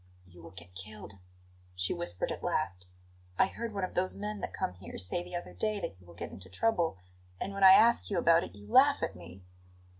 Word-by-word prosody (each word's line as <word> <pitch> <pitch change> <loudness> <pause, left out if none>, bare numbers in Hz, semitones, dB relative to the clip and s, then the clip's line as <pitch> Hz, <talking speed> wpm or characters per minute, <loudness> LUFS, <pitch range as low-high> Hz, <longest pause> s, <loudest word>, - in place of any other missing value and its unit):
"You 90 -1 -15
will 85 - -10
get 90 +1 -12
killed," 100 +1 -8 0.6
she 90 0 0
whispered 85 +1 -2
at - - -5
last. 90 -2 -1 0.5
"I - - +6
heard 230 +4 -5
one 200 -2 -3
of 185 - -3
those 185 +1 0
men 210 +1 -4
that - - -4
come - - -2
here 90 0 -10
say 95 - -2
the 175 0 -8
other 175 - -5
day 215 -1 -1
that 100 - -5
you 90 - -19
will 85 - -14
get - - -6
into 95 -1 -11
trouble 170 - +1 0.4
and 195 - -3
when 200 0 -2
I 190 0 +11
ask 230 +4 +5
you 200 - -1
about 170 -1 +5
it 90 - -9
you 100 0 -13
laugh 280 +2 +5
at - - -2
me!" 90 +2 -12
105 Hz, 230 wpm, -31 LUFS, -, 0.6 s, I